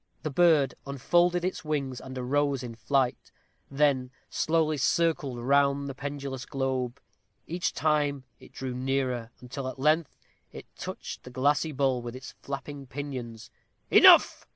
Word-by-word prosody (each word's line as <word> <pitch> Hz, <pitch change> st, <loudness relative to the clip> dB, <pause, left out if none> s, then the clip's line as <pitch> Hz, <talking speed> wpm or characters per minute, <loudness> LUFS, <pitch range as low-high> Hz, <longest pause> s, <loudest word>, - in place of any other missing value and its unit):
The 155 Hz, -, -2 dB
bird 150 Hz, -4 st, +4 dB
unfolded 175 Hz, +6 st, +2 dB
its 185 Hz, -1 st, -3 dB
wings, 140 Hz, -5 st, -2 dB
and 130 Hz, 0 st, -8 dB
arose 135 Hz, +1 st, 0 dB
in 120 Hz, -2 st, -6 dB
flight; 125 Hz, +3 st, -1 dB, 0.4 s
then 135 Hz, -3 st, +2 dB, 0.2 s
slowly 155 Hz, -1 st, +1 dB
circled 155 Hz, -2 st, +1 dB
round 140 Hz, +2 st, +2 dB
the 135 Hz, -, -4 dB
pendulous 140 Hz, -1 st, -5 dB
globe. 130 Hz, -2 st, -2 dB, 0.5 s
Each 175 Hz, +2 st, -2 dB
time 145 Hz, -3 st, 0 dB, 0.2 s
it -, -, -16 dB
drew 130 Hz, -1 st, -5 dB
nearer, 125 Hz, -2 st, -1 dB
until 130 Hz, +2 st, -6 dB
at 130 Hz, -, -6 dB
length 155 Hz, +3 st, +1 dB, 0.3 s
it -, -, -10 dB
touched -, -, -7 dB
the -, -, -10 dB
glassy 145 Hz, +5 st, +1 dB
bowl 135 Hz, -3 st, +1 dB
with 120 Hz, 0 st, -7 dB
its 130 Hz, 0 st, -9 dB
flapping 140 Hz, 0 st, -6 dB
pinions. 125 Hz, -5 st, -7 dB, 0.4 s
"Enough!" -, -, +7 dB
140 Hz, 140 wpm, -28 LUFS, 130-150 Hz, 0.5 s, Enough